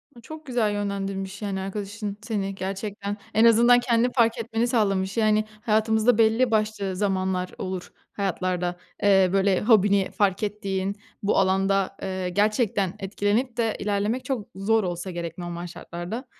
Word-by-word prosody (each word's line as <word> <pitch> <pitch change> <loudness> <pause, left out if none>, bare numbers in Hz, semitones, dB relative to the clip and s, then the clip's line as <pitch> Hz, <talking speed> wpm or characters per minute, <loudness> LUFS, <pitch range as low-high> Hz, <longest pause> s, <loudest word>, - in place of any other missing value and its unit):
Aaa, 235 - -13
çok 315 +4 -10
güzel 240 -6 +1
yönlendirmiş 195 -1 -3
yani 200 -2 -2
arkadaşın 205 +1 -5
seni 200 -3 -3
gerçekten 200 +1 -4 0.2
en 220 +2 +5
azından 235 +2 +6
kendini 245 0 +2
fark 230 -2 +3
etmeni 230 +1 -1
sağlamış 200 -4 0
yani 215 -1 +3 0.2
hayatımızda 220 +1 +2
belli 225 +2 +3
başlı 215 -3 0
zamanlar 185 -2 -1
olur, 185 -1 -5 0.2
hayatlarda, 180 -2 -1 0.3
eee, 190 -2 +5
böyle 195 -1 +3
hobini 205 -3 +4
fark 200 -2 +1
ettiğin 200 -2 -2 0.3
bu 200 - +2
alanda, 195 0 +2
eee, 185 -1 -3
gerçekten 205 -1 +1
etkilenip 210 +5 -1
de 225 -2 0
ilerlemek 210 +4 -1
çok 255 -7 -3
zor 215 +3 +2
olsa 175 +1 -4
gerek 170 -1 -5
normal 175 0 -5
şartlarda, 175 +9 -7
205 Hz, 145 wpm, -25 LUFS, 190-220 Hz, 0.3 s, azından